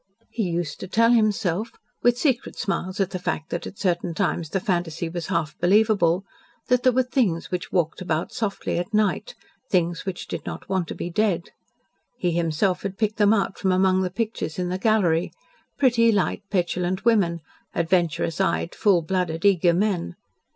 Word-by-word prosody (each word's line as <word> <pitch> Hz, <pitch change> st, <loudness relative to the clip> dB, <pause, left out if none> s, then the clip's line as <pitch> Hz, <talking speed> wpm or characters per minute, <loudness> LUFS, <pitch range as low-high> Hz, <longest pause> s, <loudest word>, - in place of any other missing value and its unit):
He 220 Hz, -6 st, -1 dB
used 170 Hz, -3 st, -3 dB
to -, -, -6 dB
tell 230 Hz, +4 st, +3 dB
himself 215 Hz, -2 st, +1 dB, 0.3 s
with 245 Hz, 0 st, +3 dB
secret 255 Hz, -3 st, 0 dB
smiles 185 Hz, 0 st, -2 dB
at 195 Hz, -1 st, +1 dB
the 185 Hz, -, -3 dB
fact 175 Hz, -3 st, -3 dB
that -, -, -3 dB
at 195 Hz, -, -10 dB
certain 175 Hz, -3 st, -1 dB
times 175 Hz, -4 st, -1 dB
the 195 Hz, -, 0 dB
fantasy 175 Hz, -3 st, -2 dB
was 170 Hz, -1 st, -5 dB
half 160 Hz, -2 st, -1 dB
believable 195 Hz, -2 st, +3 dB, 0.4 s
that 250 Hz, 0 st, +4 dB
there 255 Hz, -, +4 dB
were 260 Hz, +1 st, +2 dB
things 240 Hz, -10 st, 0 dB
which 180 Hz, -1 st, -3 dB
walked 170 Hz, -1 st, 0 dB
about 175 Hz, +4 st, -2 dB
softly 205 Hz, -5 st, -2 dB
at 180 Hz, +5 st, -3 dB
night 215 Hz, -, 0 dB, 0.3 s
things 175 Hz, -2 st, +1 dB
which 190 Hz, -2 st, -5 dB
did -, -, -5 dB
not -, -, -7 dB
want 190 Hz, -3 st, -1 dB
to -, -, -6 dB
be 175 Hz, -, -5 dB
dead. 190 Hz, -3 st, 0 dB, 0.7 s
He 180 Hz, -, 0 dB
himself 170 Hz, +2 st, 0 dB
had 195 Hz, -1 st, -5 dB
picked 215 Hz, -1 st, 0 dB
them 205 Hz, -1 st, +4 dB
out 200 Hz, -3 st, 0 dB
from 190 Hz, -, +1 dB
among 185 Hz, 0 st, +3 dB
the 185 Hz, -, 0 dB
pictures 210 Hz, -4 st, -3 dB
in 180 Hz, -1 st, -1 dB
the 185 Hz, +1 st, -2 dB
gallery 185 Hz, -6 st, +2 dB, 0.4 s
pretty, 235 Hz, -4 st, +4 dB
light, 200 Hz, -1 st, 0 dB
petulant 180 Hz, +1 st, -1 dB
women; 185 Hz, -8 st, +3 dB, 0.3 s
adventurous 170 Hz, -2 st, +1 dB
eyed, 85 Hz, 0 st, 0 dB
full 190 Hz, -5 st, +3 dB
blooded, 175 Hz, 0 st, -1 dB
eager 180 Hz, -3 st, +5 dB
men. 175 Hz, -, 0 dB
185 Hz, 180 wpm, -24 LUFS, 170-210 Hz, 0.7 s, eager